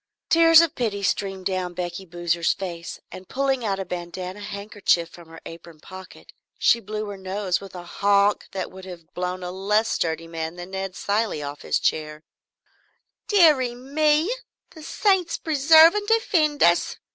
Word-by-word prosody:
Tears 330 0 +7
of 335 -2 0
pity 210 -7 -2
streamed 195 -1 -2
down 185 -2 -2
Becky 180 +2 -5
Boozer's 175 -1 0
face, 170 -3 -7
and 185 - -11
pulling 270 -2 -1
out 200 -3 -1
a 190 - -4
bandanna 180 +2 -6
handkerchief 200 -4 -1
from 170 -1 -15
her 165 0 -12
apron 165 -1 -11
pocket 185 +3 -13 0.2
she 235 - +3
blew 215 0 -5
her 200 - -7
nose 190 -1 -2
with 195 -1 -11
a 175 - -7
honk 200 +3 +1
that 195 - -5
would 190 0 -11
have 175 -3 -12
blown 180 +1 -4
a 180 - -5
less 210 +4 0
sturdy 165 0 -2
man 165 0 -5
than 175 +1 -9
Ned 190 -1 -5
Cilley 205 -7 -1
off 145 0 -7
his - - 0
chair. 155 0 -2 1.0
"Deary 300 - +4
me, 300 - +1 0.4
the 320 - -13
saints 370 +1 +1
preserve 315 +2 +6
and 415 0 -3
defend 350 -10 +2
us!" 170 0 +2
195 Hz, 165 wpm, -23 LUFS, 175-265 Hz, 1.0 s, Tears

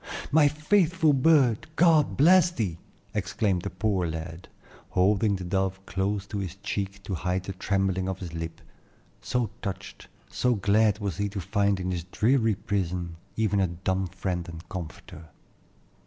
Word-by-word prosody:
"My 150 0 +6
faithful 160 +1 +2
bird, 135 -3 +3
God 160 -4 +4
bless 175 +4 +6
thee!" 100 - -3 0.3
exclaimed 95 -5 0
the - - -4
poor 95 -1 0
lad, 80 +2 -6 0.4
holding 100 +3 +2
the 95 - -5
dove 95 +1 -1
close 100 +1 -1
against 100 0 -4
his 90 -2 -5
cheek 100 -1 -3
to 100 - -4
hide 90 +1 -1
the 95 - -5
trembling 95 0 0
of 95 - -3
his 90 -3 -7
lip, 80 0 -6 0.6
so 120 -4 -1
touched, 100 -3 -6 0.2
so 125 -1 +1
glad 105 +1 +3
was 100 -6 -3
he 100 0 -1
to 100 0 -5
find 100 +1 +1
in 95 0 -2
his 85 -2 -3
dreary 110 +3 +2
prison 90 -4 -3 0.2
even 105 -2 +1
a 95 - +3
dumb 95 +2 -2
friend 90 -1 -4
and 85 +1 -10
comforter. 90 -1 -8
95 Hz, 155 wpm, -27 LUFS, 90-110 Hz, 0.6 s, My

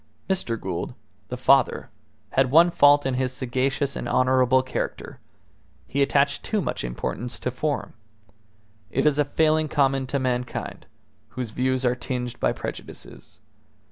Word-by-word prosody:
Mr. 150 - -1
Gould, 90 -2 -4 0.3
the - - -4
father, - - +3 0.4
had 130 -1 +2
one 165 +5 +6
fault 145 -2 +5
in 135 - 0
his 130 0 0
sagacious 130 +2 -1
and - - -4
honourable 130 0 +3
character: 130 - -5 0.7
he 140 - -2
attached 140 0 +2
too 215 - -1
much - - -3
importance 65 - -4
to 125 - -3
form. 145 +4 -3 1.0
It - - 0
is 150 -1 +3
a - - +5
failing 155 +2 +2
common 135 -3 +1
to 140 - -1
mankind, 125 -2 -3 0.4
whose 125 -4 -6
views 130 +2 0
are 125 - +3
tinged 125 -1 -4
by - - +2
prejudices. - - -9
130 Hz, 140 wpm, -24 LUFS, 125-145 Hz, 1.0 s, one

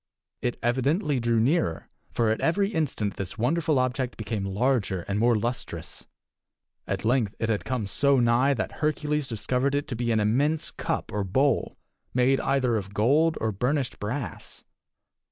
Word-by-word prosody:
It 120 - -1
evidently 135 - +1
drew 115 -1 +2
nearer, 130 - +1 0.2
for 115 -2 +1
at 110 - -1
every 195 +4 +2
instant 145 - -2
this 95 +1 -5
wonderful 155 +5 +1
object 130 0 -1
became 105 -2 -3
larger 100 -2 0
and 100 +3 -2
more 120 +1 +4
lustrous. 85 - -4 0.8
At - - -3
length 115 -3 +1
it 110 - -2
had 105 -2 -1
come 120 -2 -2
so 140 +7 +3
nigh 120 +4 +3
that 110 - -2
Hercules 150 -1 0
discovered 125 +5 0
it 145 - -1
to 125 - -3
be 120 0 -1
an 110 - +2
immense 140 +9 +1
cup - - -3
or 105 -1 0
bowl 130 +7 +1 0.4
made 130 +2 +3
either 130 -4 +1
of 100 -1 -6
gold 150 +10 +3
or 110 - 0
burnished 130 +6 -1
brass. 120 +7 -5
125 Hz, 160 wpm, -26 LUFS, 110-140 Hz, 0.8 s, more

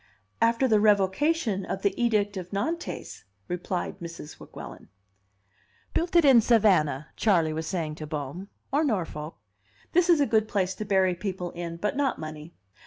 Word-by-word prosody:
"After 230 +3 +3
the 215 -3 +4
revocation 210 - +2
of 190 +1 -5
the 200 - +2
Edict 210 -4 +1
of 180 -2 -6
Nantes," 315 +13 -4 0.2
replied 180 0 -3
Mrs. 165 -3 -9
Weguelin. - - -10 1.1
"Built 345 +1 -1
it 340 -3 +6
in 260 -4 +7
Savannah," 180 - +3
Charley 170 -7 +2
was 160 0 -4
saying 160 -4 -2
to 155 - -7
Bohm, 150 +5 -5 0.3
"or 295 +3 +3
Norfolk. 170 - -3 0.5
This 355 +1 +3
is 335 -3 +6
a 285 - +4
good 220 -2 +2
place 190 -3 0
to 215 - -6
bury 190 -2 +3
people 180 -1 -4
in, 170 -1 -6
but 210 +8 -2
not 275 -2 0
money. 155 +1 -8
195 Hz, 160 wpm, -27 LUFS, 170-230 Hz, 1.1 s, in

